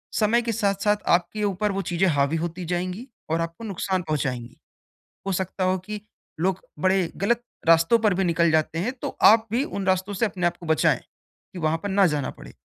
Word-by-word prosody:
समय 225 +2 +3
के 230 -1 -2
साथ-साथ 205 -1 +1 0.2
आपके 185 +5 -2
ऊपर 205 +1 0
वो 195 0 -2
चीज़ें 175 +2 +2
हावी 140 0 +1
होती 170 +2 -4
जाएँगी 180 +7 -3 0.2
और 165 +1 +1
आपको 165 +6 -5
नुकसान 190 -3 -2
पहुँचाएँगी। 130 -6 -3 0.7
हो - - 0
सकता 190 +1 -2
हो 185 0 +2
कि 210 +3 -6 0.4
लोग 185 +2 +1 0.2
बड़े 185 0 +2
गलत 235 +4 +1 0.2
रास्तों 165 +6 +5
पर 215 -3 +3
भी 190 +2 0
निकल 170 -2 +2
जाते 160 +1 +1
हैं, 210 +9 -1
तो 255 - -6
आप 220 +1 +6
भी 245 +4 +1
उन 200 -8 -4
रास्तों 190 +2 +1
से 200 +4 +1
अपने 185 -4 -2
आपको 175 0 -5
बचाएँ, 160 -2 +2 0.5
कि 185 - -7
वहाँ 160 0 +1
पर 205 - -2
ना 195 0 +4
जाना 145 -3 -1
पड़े। - - -13
185 Hz, 200 wpm, -24 LUFS, 165-205 Hz, 0.7 s, आप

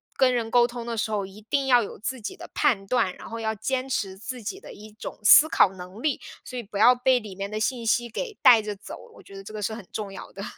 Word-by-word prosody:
跟 260 -2 +4
人 230 -2 -1
沟 240 0 +5
通 240 -1 -7
的 235 - -3
时 215 +1 -1
候， 205 -2 -1
一 195 +2 -13
定 275 -1 +1
要 245 -2 +5
有 - - -8
自 245 +2 -4
己 380 - -6
的 - - -10
判 215 -10 +1
断， 195 -6 +1
然 - - -10
后 230 - -6
要 220 0 -1
坚 260 +5 -2
持 195 -7 -2
自 245 +4 -7
己 380 - -5
的 - - -11
一 215 +1 -12
种 215 - -8
思 305 +9 +8
考 - - +5
能 185 +4 -10
力。 300 -1 -1 0.2
所 255 - -7
以 240 - -4
不 205 -1 -7
要 240 +4 +7
被 250 +1 +3
里 210 -5 -10
面 200 +1 -5
的 215 - -3
信 235 0 -1
息 240 +2 +2
给 435 - -5
带 235 -4 +8
着 210 -1 -5
走， 195 - -9 0.2
我 - - -14
觉 195 - -14
得 195 - -9
这 200 - -10
个 215 - -5
是 220 +2 -2
很 220 -4 -8
重 205 -2 -5
要 - - -9
的。 195 - -8
225 Hz, 305 characters per minute, -25 LUFS, 205-250 Hz, 0.2 s, 思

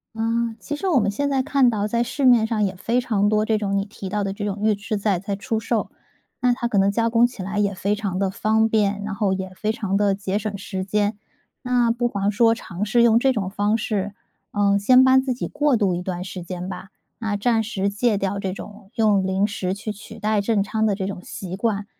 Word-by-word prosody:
啊， 230 +1 -1
其 295 - -4
实 385 +6 -3
我 325 -8 +4
们 205 -2 +1
现 285 +7 -1
在 270 -2 +1
看 270 -2 +3
到 210 -3 -1
在 235 +2 0
市 275 +3 -2
面 240 -3 +6
上 220 -2 0
也 190 -2 -1
非 230 +7 0
常 210 -5 +1
多 215 0 +2
这 220 0 +1
种 200 -1 -1
你 195 - 0
提 200 -2 -8
到 205 +1 -1
的 195 0 -2
这 205 - -6
种 205 -1 -2
预 215 0 +4
制 210 +1 -3
菜 200 -3 0
在 200 +2 -3
出 220 +2 -2
售， 225 0 -1 0.5
那 250 0 +4
它 240 0 -1
可 210 -4 +1
能 195 +1 +3
加 230 +2 +1
工 235 +1 +4
起 230 -6 -8
来 195 +2 -3
也 200 -1 +1
非 195 +3 0
常 200 -4 -3
地 195 0 +1
方 220 +3 +2
便， 205 -2 +1
然 210 0 -4
后 195 -1 0
也 190 0 -3
非 215 +3 -1
常 205 -3 -2
地 200 -1 +2
节 195 0 -2
省 210 -1 -4
时 190 -1 -5
间。 205 +2 0 0.4
那 245 -2 +2
不 240 +1 0
妨 200 -3 -1
说 225 +2 +4
尝 190 -4 -6
试 235 +3 +3
用 230 -1 +5
这 265 +2 +3
种 200 -5 -2
方 205 +2 +1
式， 205 -2 -2 0.4
嗯， 200 -1 +2
先 255 +5 +6
帮 260 0 +6
自 260 -1 -1
己 - - -4
过 290 -3 +1
渡 200 -4 +1
一 175 - -2
段 180 -1 -4
时 185 0 -7
间 180 +1 -6
吧， 185 0 -7 0.3
那 220 -3 -1
暂 225 +2 +2
时 205 -3 -2
戒 210 +2 +1
掉 195 0 -2
这 190 -1 -2
种 200 +1 -10
用 210 -4 +3
零 190 +1 +1
食 190 -2 -2
去 215 +2 -5
取 210 +2 -11
代 215 -1 +1
正 205 -1 +1
餐 220 +2 0
的 205 - +1
这 190 -1 -3
种 190 -2 -5
习 185 -2 -6
惯。 205 0 -1
210 Hz, 265 characters per minute, -22 LUFS, 195-230 Hz, 0.5 s, 面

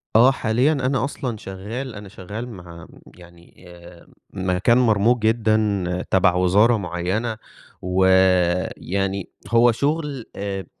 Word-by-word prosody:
آه، 125 +4 +7
حاليًا 125 +4 +1
أنا 135 -2 0
أصلًا 130 -5 -4
شغال، 110 +7 -7
أنا 100 -1 -10
شغال 105 +6 -7
مع 85 -5 -11 0.3
يعني 85 0 -18
آآ، 85 0 -15 0.3
مكان 95 +6 +1
مرْموق 115 0 +3
جدًا 110 -5 0
تَبَع 90 -1 +3
وزارة 100 +6 +3
معيّنة 100 +5 -3 0.4
ويعني 95 +1 +1 0.2
هو 120 0 +4
شُغل 145 0 -2
آآ، 100 -1 -4
100 Hz, 110 wpm, -21 LUFS, 90-115 Hz, 0.4 s, آه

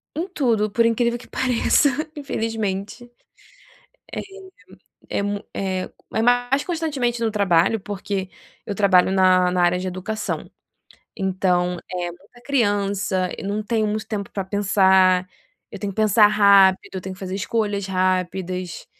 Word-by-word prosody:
Em 335 +5 -2
tudo, 235 - 0
por 230 +3 +2
incrível 235 +1 +1
que - - -15
pareça 260 +3 +2 0.3
infelizmente. 225 -5 -3 2.0
É - - -2
é - - 0
mu 205 0 -3
é 185 -1 -3 0.2
é 220 - +1
mais 245 +3 +2
constantemente 290 -9 -2
no 225 - +1
trabalho, 200 0 +2
porque 195 -1 -4 0.4
eu - - -3
trabalho 190 -2 +4
na 185 -1 +4
na 180 -1 +1
área 175 +1 +2
de 185 - -4
educação, 185 +4 -4 0.7
então 180 -2 0
é 180 -1 -3
muita 195 +7 -17
criança. 200 -7 0
Eu - - -6
não 205 +2 -2
tenho 215 0 0
muito 210 0 -3
tempo 205 -2 -4
para 195 - -4
pensar. 190 -2 +3 0.4
Eu - - -8
tenho 200 -2 -4
que - - -21
pensar 215 0 +5
rápido 200 -3 +4
eu 190 - -3
tenho 185 +1 -7
que - - -18
fazer 190 0 -5
escolhas 205 -1 -1
rápidas, 185 -1 -2
200 Hz, 145 wpm, -22 LUFS, 185-225 Hz, 2.0 s, pensar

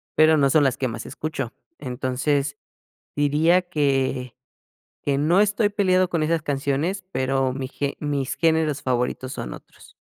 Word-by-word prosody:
pero 155 0 +6
no 140 -1 +4
son 150 +1 +4
las 130 -2 +1
que 130 - -1
más 115 - -6
escucho. 145 -6 -4 0.3
Entonces, 140 +3 -1 0.6
diría 155 +5 +3
que 135 -6 0 0.7
que 140 -1 0
no 165 +6 +3
estoy 210 0 +2
peleado 185 -3 +2
con 165 -3 0
esas 160 0 +1
canciones, 145 +7 -1
pero 130 0 0
mi 130 -1 -4
ge 140 0 -3
mis 145 -3 -2
géneros 160 -3 +1
favoritos 130 +1 -1
son - - -5
otros. - - -15
145 Hz, 150 wpm, -23 LUFS, 135-160 Hz, 0.7 s, pero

